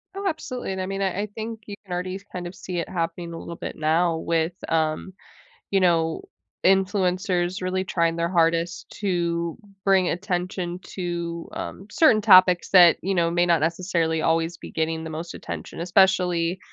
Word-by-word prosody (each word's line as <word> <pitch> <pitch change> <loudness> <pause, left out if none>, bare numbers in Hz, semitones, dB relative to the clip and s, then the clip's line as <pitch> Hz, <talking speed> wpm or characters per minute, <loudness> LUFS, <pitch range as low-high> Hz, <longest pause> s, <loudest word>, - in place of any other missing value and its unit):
Oh, 395 0 -3
absolutely, 265 - -4
and 190 - -3
I - - -2
mean, 195 +1 -4
I 190 0 0
I - - -1
think 225 0 -5
you 205 - -7
can 185 - -6
already 185 +2 -3
kind 180 -1 -5
of 175 - -8
see 180 0 -6
it 170 - -3
happening 170 -1 -3
a 165 - -6
little 170 - -7
bit - - -6
now 160 +2 +1
with, 165 +1 0 0.2
um, 160 +3 0 0.6
you 195 - +3
know, 165 -3 +2 0.4
influencers 185 -1 +1
really 185 +1 -1
trying 170 -2 0
their 170 0 0
hardest 170 -1 +1
to 170 -4 -1 0.3
bring 190 -2 +4
attention 180 -1 -3
to, 170 -2 -5
um, 195 - -6
certain 265 -8 +4
topics 185 -4 +6
that, 175 -3 +8
you 195 +2 -1
know, 170 -2 +2
may 175 +1 +2
not 170 -2 +3
necessarily 165 0 0
always 165 +1 +1
be - - -10
getting 160 0 -2
the 160 - -5
most 165 +2 -6
attention, - - -7
especially, 180 -1 +2
175 Hz, 175 wpm, -24 LUFS, 165-190 Hz, 0.6 s, that